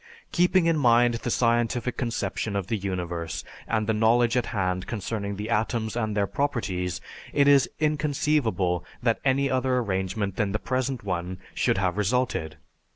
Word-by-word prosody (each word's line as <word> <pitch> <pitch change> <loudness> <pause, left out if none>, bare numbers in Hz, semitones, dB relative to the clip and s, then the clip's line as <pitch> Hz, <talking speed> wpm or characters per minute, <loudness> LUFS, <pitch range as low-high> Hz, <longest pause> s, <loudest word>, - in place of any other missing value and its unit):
Keeping 180 0 +3
in 165 -1 +3
mind 120 -2 +5
the 115 +1 -3
scientific 120 +1 +1
conception 115 -3 -2
of 100 -2 -1
the 110 - -1
universe 90 -4 -3 0.2
and 110 -1 0
the 110 - +1
knowledge 115 +2 +3
at 125 -2 +1
hand 90 -4 -1
concerning 100 -2 -3
the 105 +3 -5
atoms 110 0 0
and 110 -3 -1
their 100 - +3
properties, 95 -10 -2 0.3
it 140 -1 +3
is 140 -2 +5
inconceivable 145 - +1 0.2
that 115 -2 +2
any 140 +1 +2
other 130 -1 +1
arrangement 95 -2 -1
than 100 -2 0
the - - +1
present 130 0 -2
one 90 -1 -3 0.2
should - - +1
have 95 -1 0
resulted. 105 -7 0
115 Hz, 155 wpm, -26 LUFS, 95-125 Hz, 0.3 s, mind